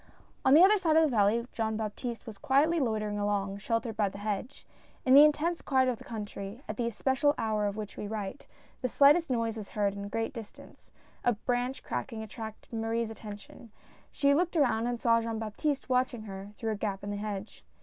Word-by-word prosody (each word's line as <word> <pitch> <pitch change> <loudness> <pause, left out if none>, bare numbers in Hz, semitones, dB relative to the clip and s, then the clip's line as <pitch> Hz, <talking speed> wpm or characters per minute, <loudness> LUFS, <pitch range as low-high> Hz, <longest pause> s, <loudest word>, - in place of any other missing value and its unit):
On 265 +2 +6
the 330 - +9
other 410 +2 +6
side 325 -4 +2
of 320 - +6
the 290 -6 +1
valley 215 +3 +3
Jean 220 -1 -1
Baptiste 225 +2 -4
was 215 -3 -9
quietly 305 +5 +3
loitering 215 -5 -1
along, 200 -1 -1
sheltered 230 +1 -2
by 210 -2 +1
the 200 - -10
hedge. 210 +6 -4 0.4
In 260 - +5
the 285 +2 +10
intense 310 +3 +2
quiet 260 -2 +2
of 245 -3 -1
the - - -11
country, 210 0 -7
at - - -4
the 240 -2 0
especial 265 +5 +1
hour 215 -2 0
of 200 - -3
which 210 -2 -6
we 210 - -4
write, 210 +2 -5 0.3
the 255 - 0
slightest 290 +6 +5
noise 230 -3 0
is 205 - -8
heard 205 -1 0
at 200 - -5
a 200 - -6
great 225 +1 -2
distance; 225 -4 -12 0.3
a 245 - +3
branch 245 +4 -2
cracking 225 -4 -4
attracted 220 +1 -9
Marie's 225 0 -1
atten 210 -2 -8
tion. 220 +2 -15 0.4
She 280 0 +3
looked 345 +3 +1
around 240 -5 +2
and 240 -1 -2
saw 230 -1 +3
Jean 225 -1 -3
Baptiste 225 +7 -2
watching 250 -3 0
her, 195 -1 -8
through 225 0 -2
a - - -1
gap 200 -2 -3
in 205 - -4
the 205 - -3
hedge. 205 0 -6
225 Hz, 210 wpm, -30 LUFS, 210-260 Hz, 0.4 s, the